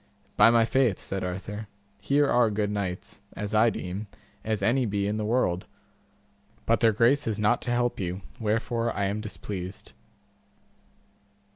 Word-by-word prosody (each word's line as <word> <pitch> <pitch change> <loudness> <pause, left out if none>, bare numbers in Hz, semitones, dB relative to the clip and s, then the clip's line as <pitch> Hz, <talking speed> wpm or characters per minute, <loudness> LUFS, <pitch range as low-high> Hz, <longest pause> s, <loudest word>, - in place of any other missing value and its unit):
By - - +7
my 115 -1 +4
faith, 125 -5 +2
said 95 -1 -4
Arthur, 100 +4 -5 0.3
here 140 +7 +3
are 120 -3 +4
good 105 0 -1
knights, 95 -3 -4
as 105 +1 -4
I 110 +2 +5
deem, 100 0 -5 0.4
as 110 -2 -2
any 120 +3 +2
be 100 -1 -1
in 105 +1 -1
the 105 - -2
world, 105 -6 0 1.0
but - - +3
their 115 - +5
grace 120 +6 +3
is 110 -2 -1
not 105 +3 +2
to 120 - -2
help 120 0 0
you, 95 0 -3 0.2
wherefore 115 +1 0
I 100 - 0
am 100 +2 -1
displeased. 100 -3 -7
105 Hz, 155 wpm, -27 LUFS, 100-115 Hz, 1.0 s, By